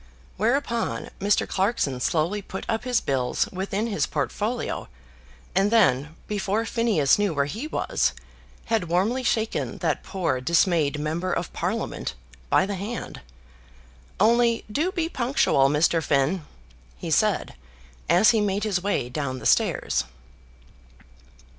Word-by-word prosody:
Whereupon 235 +2 -1
Mr. 200 +1 +2
Clarkson 190 - 0
slowly 170 +10 0
put 190 0 -7
up 225 +1 -2
his 250 -1 +2
bills 130 -3 0
within 195 +3 -2
his 215 -4 0
portfolio, 225 +3 -2 0.7
and 195 +3 +3
then, 160 - +3
before 210 +2 -1
Phineas 220 - +2
knew 200 -6 +1
where 140 0 +2
he 220 - -5
was, - - 0 0.5
had 225 -5 0
warmly 195 +10 +1
shaken 225 -3 -1
that - - -1
poor 165 -10 -2
dismayed 160 0 +2
member 165 +5 -2
of - - -2
Parliament - - -3 0.3
by - - +4
the 200 - -3
hand. 205 +5 -5 1.0
"Only 235 +2 +3
do 315 - 0
be 335 -4 -1
punctual, 240 - +2
Mr. 160 +3 +2
Finn," 150 +3 +1 0.5
he - - -5
said, - - +2 0.6
as 180 +7 +6
he 225 -2 +2
made 200 0 0
his 200 -5 0
way 200 -10 0
down 130 0 -3
the - - -9
stairs. 65 -2 +2
195 Hz, 130 wpm, -25 LUFS, 155-225 Hz, 1.0 s, as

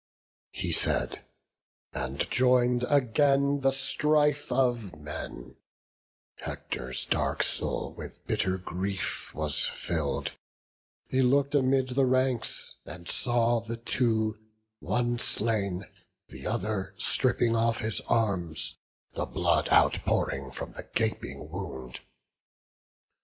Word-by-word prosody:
He - - -3
said, - - 0 0.7
and 65 +2 -2
join'd 125 0 +4
again 140 +1 +3
the 135 0 +4
strife 145 +2 +2
of 120 -8 +1
men: 75 -5 -7 0.8
Hector's 65 +1 -4
dark - - +1
soul - - -2
with - - -10
bitter 95 0 +1
grief 95 +2 -3
was 75 -1 0
fill'd; 80 -4 -2 0.8
He 130 - +2
look'd 140 +3 +3
amid 130 -2 +3
the 130 +1 +3
ranks, 130 -2 0
and 85 -1 -9
saw 120 0 +2
the 115 +1 -5
two, 110 -2 +1 0.4
One 120 +3 0
slain, 100 -6 -1 0.4
the - - -6
other 95 -1 -2
stripping 120 +1 +2
off 115 0 +2
his 110 -1 -1
arms, 90 -8 0 0.3
The - - -2
blood - - +2
outpouring 70 -1 +3
from 65 - -6
the - - -9
gaping - - -1
wound. 65 -1 -6
115 Hz, 105 wpm, -29 LUFS, 95-130 Hz, 0.8 s, join'd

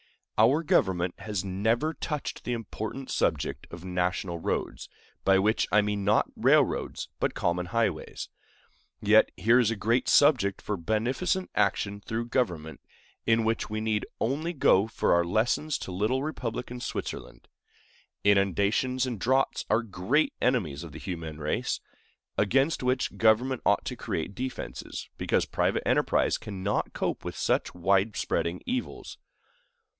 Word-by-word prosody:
Our 130 +9 +4
government 90 - +2
has 100 -3 -3
never 110 +11 0
touched 150 -2 -4
the 125 - -2
important 115 +3 -5
subject - - -1
of 85 +1 -9
national 90 -1 -1
roads, - - -3 0.3
by 95 0 +5
which 105 +4 +2
I 105 - +5
mean 105 -1 -1
not 105 +2 +3
railroads, - - +2
but - - 0
common 90 0 0
highways; 100 -5 -1 0.7
yet - - +5
here 115 +3 +4
is 120 -4 +3
a 115 - -1
great 115 +4 +1
subject 125 -10 +4
for 105 - -3
beneficent 125 - -1
action 100 0 0
through 115 +3 -4
government, 85 -12 -1 0.5
in 115 0 +4
which 115 +1 -1
we 110 0 -2
need 110 -1 -1
only 150 +8 -1
go 105 - +4
for 115 - +1
our 85 0 +4
lessons 110 - +1
to - - -7
little 110 +9 0
republican 125 -4 -4
Switzerland. - - -6 0.8
Inundations 100 +6 +2
and 120 -5 -4
droughts 130 +5 +1
are 110 +2 +3
great 110 +9 0
enemies 90 - 0
of 80 -3 -10
the - - -7
human 80 -4 -6
race, 75 0 -1 0.6
against 135 +9 +2
which 125 0 0
government 120 +3 +3
ought - - +2
to - - -3
create - - -3
defenses, 100 - -5
because - - +1
private - - 0
enterprise - - +2
cannot 100 0 -2
cope - - -2
with - - -5
such - - 0
wide 95 +4 +2
spreading 85 +1 -1
evils. 255 0 -4
110 Hz, 140 wpm, -28 LUFS, 95-125 Hz, 0.8 s, by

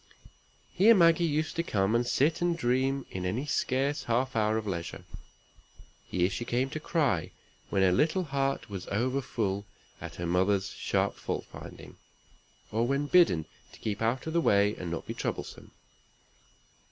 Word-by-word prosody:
Here 220 +5 +6
Maggie 170 -2 +5
used 155 +2 -1
to - - +3
come 100 -9 0
and 120 +1 +2
sit 155 +7 +2
and 175 -1 +1
dream 130 0 0
in 95 - -4
any 110 +10 -2
scarce 140 +1 0
half 125 +2 0
hour 110 0 +2
of 110 - -3
leisure. 85 -4 -5 1.0
Here 90 -1 +1
she 100 - -4
came 125 +3 -1
to 155 - -4
cry, 145 - 0 0.4
when 95 -1 +2
her 95 - +5
little 155 - +2
heart 135 -3 -1
was 95 -3 -7
overfull 110 -3 -1 0.3
at - - -7
her 85 - -4
mother's 95 +3 +1
sharp - - 0
fault - - -4
finding, - - -11 0.7
or 115 +2 +1
when 140 +2 0
bidden 145 - +4 0.3
to - - -14
keep 105 -1 -3
out 115 +3 0
of 160 - -4
the 170 - +3
way, 100 -5 +3
and 90 - -6
not 85 - -4
be - - -5
troublesome. - - -5
120 Hz, 165 wpm, -29 LUFS, 100-145 Hz, 1.0 s, Here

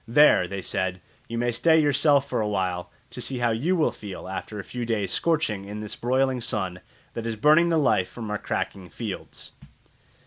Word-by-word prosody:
"There," 120 -7 +6
they 100 0 -5
said, 95 0 -2 0.3
"you 115 - -4
may 120 +1 +1
stay 160 +7 +4
yourself 145 -1 +3
for - - -1
a 105 - 0
while, 90 -3 -2 0.2
to - - -6
see 135 - -3
how 120 -1 +1
you 145 +12 +1
will 155 -8 +2
feel 100 -5 -8
after 95 +3 -5
a 100 - -5
few 125 +4 -5
days' 110 -5 -1
scorching 150 -12 0
in 105 +1 -6
this 105 - -5
broiling 130 +1 +1
sun 95 -5 -2 0.3
that 115 0 -4
is 115 - -2
burning 155 +9 +5
the 165 - +3
life 125 -11 +2
from 110 -3 -6
our 105 - -2
cracking 95 -3 -3
fields." 105 +3 -7
115 Hz, 200 wpm, -25 LUFS, 100-135 Hz, 0.3 s, There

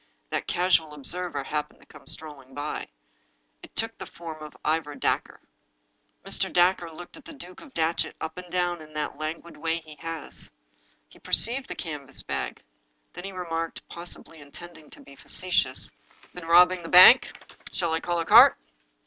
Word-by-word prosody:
That - - -2
casual 170 -4 +2
observer 175 +2 -3
happened 150 +1 -4
to - - -19
come - - -16
strolling 145 -4 -5
by. 145 +1 -4 0.7
It - - -14
took 225 0 -2
the 190 - -7
form 160 -2 -9
of 150 -1 -10
Ivor 155 -2 0
Dacre. - - -1 0.9
Mr. - - +1
Dacre 175 -1 +3
looked 175 - -11
the 325 - -11
Duke 185 -11 -10
of 300 - -14
Datchet 165 +1 0
up 160 0 -5
and 180 -1 -11
down 175 -2 0
in 155 0 -13
that 150 -1 -4
languid 160 +2 -5
way 165 +2 -1
he 155 -1 -14
has. 165 -2 -5 0.6
He - - -19
perceived 260 +4 +2
the - - -5
canvas 145 -5 -5
bag. - - -4 0.5
Then 175 +2 -8
he 195 - -5
remarked, 165 -3 -4
possibly 170 -1 -7
intending 155 +2 -12
to - - -15
be 140 - -15
facetious: 145 -5 -1 0.4
"Been 180 -2 -9
robbing 180 +2 +6
the 165 - -8
bank? 185 +8 +9 0.4
Shall 170 -2 -1
I 160 - +1
call 175 +1 -1
a 165 - -1
cart?" - - +8
165 Hz, 165 wpm, -26 LUFS, 155-180 Hz, 0.9 s, bank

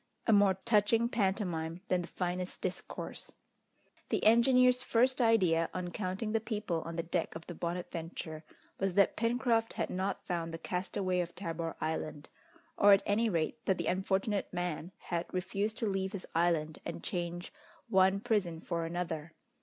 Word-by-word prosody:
A 225 - +4
more 200 -2 +5
touching 225 +2 +3
pantomime 185 -6 -1
than 180 -1 +2
the 175 - -6
finest 180 +1 -3
discourse. 185 -1 -5 0.8
The - - 0
engineer's 250 +3 +6
first 255 +1 +2
idea, 185 -8 +4
on 180 -1 -3
counting 190 +3 -3
the 225 - +2
people 210 -7 -2
on 165 - -5
the 165 - -1
deck 170 -1 -2
of 165 - -7
the 175 - -7
Bonadventure, 165 -2 -5 0.4
was 195 -2 0
that 200 -1 +4
Pencroft 230 0 +1
had - - -2
not 190 +2 -2
found 170 -2 -2
the 165 - -4
castaway 185 +1 -1
of 175 -1 -3
Tabor 165 -3 -4
Island, 155 -1 -3 0.5
or 205 0 +8
at 195 - +4
any 220 +3 +2
rate 165 -5 -1
that 190 - +2
the 170 - -2
unfortunate 195 +3 0
man 175 -1 -3
had 170 -1 -4
refused 195 +4 -2
to 235 - -1
leave 195 -1 -1
his 195 - -5
island 165 -2 +1
and - - -6
change 175 0 -3 0.3
one 190 +1 +4
prison 205 -8 0
for 170 0 -2
another. 165 -2 -4
185 Hz, 160 wpm, -32 LUFS, 170-210 Hz, 0.8 s, or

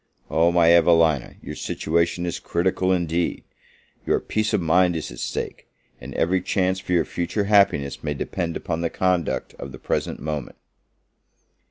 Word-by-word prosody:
Oh, 85 +2 +3
my 85 -1 +5
Evelina, 80 -5 +3
your - - -6
situation 85 +2 -1
is 85 - -3
critical 95 +1 0
indeed! 85 -1 0 0.6
your - - +1
peace 110 0 -1
of - - +2
mind 90 +1 +3
is 80 - -4
at - - -10
stake, - - -4 0.3
and - - -9
every 90 +3 +1
chance 95 -1 0
for 90 - -4
your 85 - +3
future 90 +4 -2
happiness 100 -9 +2
may 75 -1 -2
depend 85 +3 -3
upon 80 - -3
the 85 - 0
conduct 90 -2 -1
of 70 - -7
the 65 - -9
present - - -2
moment. 75 -4 -5
85 Hz, 160 wpm, -23 LUFS, 80-90 Hz, 0.6 s, my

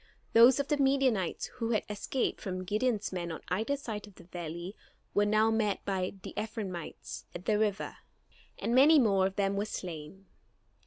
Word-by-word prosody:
Those 240 +4 +8
of 280 - 0
the 295 - +2
Midianites 270 -9 +2
who 230 -2 -2
had 215 - +1
escaped 210 +5 -2
from 185 -2 -4
Gideon's 215 +2 0
men 175 -2 -3
on 160 - -6
either 220 +10 0
side 215 -6 -6
of 205 - -16
the - - -14
valley 175 +2 -6 0.4
were 205 0 +3
now 215 +1 +4
met 215 -3 0
by 190 -1 -1
the - - -7
Ephraimites 205 -6 -5
at 175 +2 -7
the 210 -1 +2
river, 210 -2 -1 0.6
and 235 - -1
many 285 +5 +7
more 200 -7 +4
of 190 - -7
them 200 -1 +1
were 200 - 0
slain. 180 -2 -7
205 Hz, 175 wpm, -31 LUFS, 185-230 Hz, 0.6 s, Those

